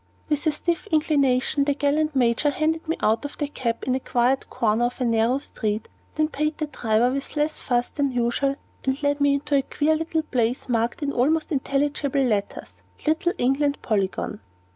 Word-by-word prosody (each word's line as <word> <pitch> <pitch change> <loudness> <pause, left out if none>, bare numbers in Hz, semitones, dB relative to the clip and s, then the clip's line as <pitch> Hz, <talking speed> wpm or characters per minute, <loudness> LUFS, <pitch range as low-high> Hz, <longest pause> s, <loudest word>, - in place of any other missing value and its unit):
With 300 +1 0
a - - +4
stiff 340 +6 -2
inclination, 285 -5 +2
the 285 -1 +1
gallant 295 +1 +1
Major 245 +3 +3
handed 315 +3 -1
me 325 - -1
out 220 +1 +2
of 285 - -6
the 295 - -1
cab 235 -5 -3
in 255 - +1
a 260 - +1
quiet 250 +1 +1
corner 225 +1 +1
of 245 +2 -3
a 255 - 0
narrow 230 +2 +2
street, 215 -6 -3 0.3
then 310 0 +2
paid 305 0 -2
the 310 - -1
driver 240 -4 +1
with 275 +3 -4
less 300 +1 0
fuss 240 -1 0
than 280 -2 -1
usual, 245 +3 0 0.3
and 265 +2 -1
led 285 0 +1
me 285 0 +4
into 290 +1 -3
a 280 - +5
queer 300 +3 +1
little 320 0 -1
place 245 -3 -1
marked 235 +6 0
in 280 - 0
almost 310 +7 +1
illegible 280 0 0
letters, 210 -5 -2 0.2
"Little 335 +4 +1
England 280 +3 +1
Polygon." 195 - -1
280 Hz, 185 wpm, -24 LUFS, 245-300 Hz, 0.3 s, a